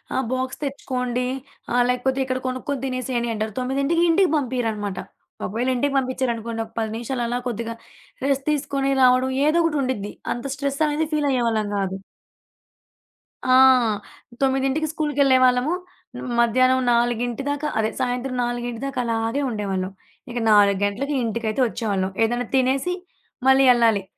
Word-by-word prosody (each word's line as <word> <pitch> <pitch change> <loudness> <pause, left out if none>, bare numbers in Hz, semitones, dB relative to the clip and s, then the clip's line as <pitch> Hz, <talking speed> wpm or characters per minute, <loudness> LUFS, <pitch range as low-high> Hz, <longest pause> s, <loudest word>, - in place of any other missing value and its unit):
ఆహ్, 260 - 0
బాక్స్ 255 0 -3
తెచ్చుకోండి 250 -3 -2 0.5
ఆహ్, 245 - +4
లేకపోతే 260 +2 0
ఇక్కడ 255 0 -2
కొనుక్కొని 255 +1 -3
తినేసేయండి 255 -2 -2
అంటారు. 215 -1 -3
9కి 275 +6 +1
ఇంటికి 360 0 +4
పంపియరనమాట. 225 -7 -2 0.5
ఒకవేళ 235 +6 -2
ఇంటికి 280 +3 0
పంపిచ్చారనుకోండి 235 -3 -1
ఒక 220 - -19
10 220 - -1
నిమిషాలు 240 +2 -3
అలా 245 +1 -1
కొద్దిగా 230 -1 -3 0.5
రెస్ట్ 275 -1 0
తీసుకొని 275 -2 -1
రావడం 255 +1 +5 0.2
ఏదో 320 +3 +3
ఒకటుండిద్ది. 260 -10 -1 0.2
అంత 240 +3 -7
స్ట్రెస్సనేది 295 +2 0
ఫీలయ్యేవాళ్ళం 240 -8 +1
గాదు. 195 -1 -2 1.5
ఆ! 255 - +4 0.9
9కి 270 +3 +1
స్కూలుకెళ్ళేవాళ్ళము. 275 -2 +3 0.7
మధ్యాహ్నం 255 +2 +4
4 240 +2 0
దాకా 290 +1 -1
అదే 220 0 +1
సాయంత్రం 250 +1 -2
4 240 0 -3
దాకా 275 -2 -3
అలాగే 230 +4 -1
ఉండేవాళ్ళం. 195 -4 -2 0.4
ఇక 240 - -5
4 200 -2 +5
గంటలకి 275 +8 -2
ఇంటికైతే 225 +1 -1
వచ్చేవాళ్ళం. 200 -5 -2
ఏదన్నా 240 +1 -2
తినేసి 265 +6 +2 0.5
మళ్ళీ 265 0 +6
యెళ్ళాలి. 230 -5 +4
250 Hz, 125 wpm, -23 LUFS, 230-270 Hz, 1.5 s, మళ్ళీ